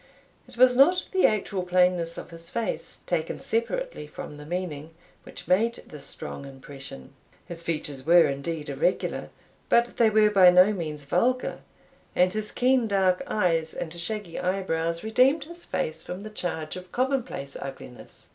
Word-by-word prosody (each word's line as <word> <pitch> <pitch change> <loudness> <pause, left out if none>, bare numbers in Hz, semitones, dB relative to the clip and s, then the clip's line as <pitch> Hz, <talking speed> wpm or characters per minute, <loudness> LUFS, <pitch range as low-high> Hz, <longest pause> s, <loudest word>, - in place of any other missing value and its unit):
It - - -15
was 250 0 +6
not 345 +8 +4
the 380 -1 +5
actual 200 -2 -1
plainness 180 -2 +2
of - - -8
his 165 0 -10
face, 230 -1 -3
taken 165 -2 -2
separately 235 - -2
from 150 0 -9
the 150 0 -11
meaning, 165 -3 -4 0.3
which - - -12
made 225 +6 +2
this 150 -2 -8
strong - - -6
impression. 135 - -11 0.3
His 170 -1 -8
features 150 -5 -3
were, 170 +3 +6
indeed, 150 +3 -3
irregular, - - -1 0.4
but 235 0 +3
they 230 -2 +5
were 215 0 +4
by 190 -3 +8
no 180 +4 +6
means 155 -6 -5
vulgar; 255 - 0 0.6
and 180 +1 +3
his 215 0 -3
keen 250 -2 +2
dark 190 -3 +2
eyes, 165 -6 0
and 160 -1 -5
shaggy 175 +1 -3
eyebrows, 170 -3 -1
redeemed 255 +7 +3
his 340 +3 -10
face 160 +1 -2
from 180 +3 -7
the 215 +1 -8
charge 160 -6 -4
of 185 0 -10
commonplace 255 - -2
ugliness. 135 -2 -10
180 Hz, 155 wpm, -26 LUFS, 160-220 Hz, 0.6 s, by